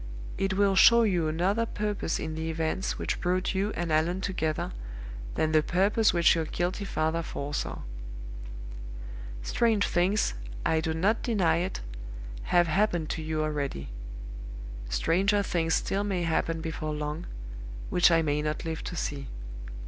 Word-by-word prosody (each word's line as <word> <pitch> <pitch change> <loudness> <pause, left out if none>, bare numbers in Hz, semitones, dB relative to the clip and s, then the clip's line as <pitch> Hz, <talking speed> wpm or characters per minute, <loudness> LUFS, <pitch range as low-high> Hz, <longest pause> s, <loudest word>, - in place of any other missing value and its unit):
It 195 -1 0
will 200 -1 +4
show 235 +4 +8
you 180 -7 +2
another 190 +9 +1
purpose 210 -6 -1
in 160 0 -3
the 160 +1 -3
events 160 +3 -1
which - - -2
brought 185 +2 +1
you 195 +2 +1
and 170 -1 -1
Allan 165 +4 +2
together 160 -6 -1 0.6
than 155 - +2
the 155 -1 +5
purpose 200 +7 +3
which 170 -1 +5
your 165 -2 0
guilty 180 +5 -1
father 160 -2 0
foresaw. 145 -2 -3 1.6
Strange 215 - +3
things, 185 - +2 0.3
I 160 - +3
do 160 -1 -1
not 200 +7 +2
deny 195 -10 +3
it, 180 +2 -2 0.6
have 175 0 +5
happened 175 -2 +1
to 165 - -3
you 155 0 -1
already. 145 - -2 1.0
Stranger 190 - +3
things 165 -4 +1
still 195 +1 0
may 190 -4 0
happen 165 0 0
before 155 -2 -3
long, 150 +3 -3 0.6
which 180 0 +6
I 165 -1 +4
may 150 -1 +1
not 150 +1 -2
live 160 0 -3
to 180 - -4
see. 140 -4 -3
170 Hz, 150 wpm, -29 LUFS, 155-195 Hz, 1.6 s, show